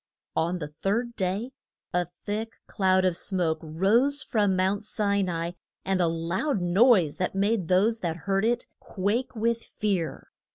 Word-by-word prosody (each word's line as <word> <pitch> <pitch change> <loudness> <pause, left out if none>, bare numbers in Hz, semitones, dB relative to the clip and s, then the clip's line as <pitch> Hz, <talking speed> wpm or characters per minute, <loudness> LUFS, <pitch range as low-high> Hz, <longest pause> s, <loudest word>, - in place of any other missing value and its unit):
On 170 +3 +1
the 150 -3 -7
third 235 +4 0
day 200 +6 -2 0.4
a 180 0 +2
thick 205 +6 -5
cloud 185 -2 +2
of 180 -2 +2
smoke 170 -4 0
rose 220 - +2
from 205 -6 +1
Mount 190 +3 +1
Si 200 -1 0
na 185 -2 -1
i, 170 +2 -4 0.3
and 190 -1 +1
a 170 - +3
loud 170 - -1
noise 180 - +4
that 185 - -2
made 200 -2 +1
those 205 +6 +3
that 170 -5 -2
heard 195 0 +1
it 235 +2 +1
quake 215 +7 -2
with 230 +1 0
fear. 195 -6 -3
195 Hz, 160 wpm, -27 LUFS, 180-220 Hz, 0.4 s, noise